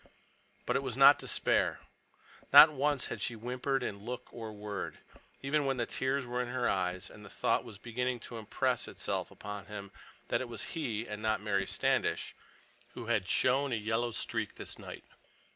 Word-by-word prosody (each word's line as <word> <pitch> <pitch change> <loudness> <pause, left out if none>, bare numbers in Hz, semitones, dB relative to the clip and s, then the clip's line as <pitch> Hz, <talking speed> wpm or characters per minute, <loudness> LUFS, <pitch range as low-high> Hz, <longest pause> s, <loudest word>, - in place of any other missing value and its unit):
But - - 0
it - - +2
was 130 -3 -4
not 140 +1 +8
despair. - - +1 0.7
Not 155 - +11
once 145 0 +1
had - - -5
she 120 - -1
whimpered 125 +4 -1
in 100 -4 -3
look 125 +4 -7
or 115 -2 -6
word, 105 -1 -5 0.5
even 145 +2 +2
when 135 -1 +1
the 120 - 0
tears 130 +2 -1
were 125 +1 -1
in 125 - -3
her 125 0 0
eyes, 90 -1 -1
and 105 - -13
the 100 - -11
thought - - +1
was 100 - -10
beginning 120 +3 -2
to 115 0 -7
impress 110 - 0
itself - - -3
upon 105 -3 -7
him 100 -1 -7 0.4
that - - +1
it 130 - -5
was 115 -3 -5
he—and 115 - -3
not 110 -2 +1
Mary 100 -2 0
Standish—who - - -3
had 110 -5 +1
shown 135 +2 +3
a - - +2
yellow 115 +2 0
streak 115 - -3
this - - -8
night. - - -9
120 Hz, 175 wpm, -32 LUFS, 105-130 Hz, 0.7 s, Not